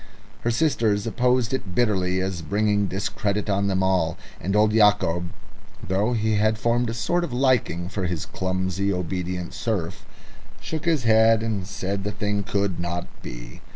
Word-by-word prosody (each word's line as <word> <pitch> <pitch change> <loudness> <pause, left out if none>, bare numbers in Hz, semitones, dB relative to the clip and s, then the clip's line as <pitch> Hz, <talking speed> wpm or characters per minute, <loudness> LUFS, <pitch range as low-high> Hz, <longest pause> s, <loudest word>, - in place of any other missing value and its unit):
Her 120 - -1
sisters 115 -6 +1
opposed 125 +1 +1
it 95 -9 -3
bitterly 95 -6 +1
as 95 -2 -3
bringing 105 +3 +1
discredit 100 +1 -2
on 100 0 +1
them 95 -1 +1
all; 90 -3 +1 0.2
and 95 +3 -2
old 105 0 +4
Yacob, 105 -5 +3 0.6
though 100 +5 +1
he 110 -2 +1
had 110 +1 +2
formed 120 +1 +1
a - - -2
sort 175 +9 0
of 170 - -4
liking 120 -9 +1
for 95 -1 -3
his 85 -3 -2
clumsy, 95 +1 -1
obedient 90 -1 -3
serf, 100 -3 -3 0.6
shook 155 - -5
his 160 -6 +2
head 110 0 +5
and 105 -5 -2
said 100 0 -3
the 105 - -2
thing 105 -1 -1
could 100 -3 -1
not 85 0 -3 0.2
be. - - -9
100 Hz, 160 wpm, -24 LUFS, 95-110 Hz, 0.6 s, head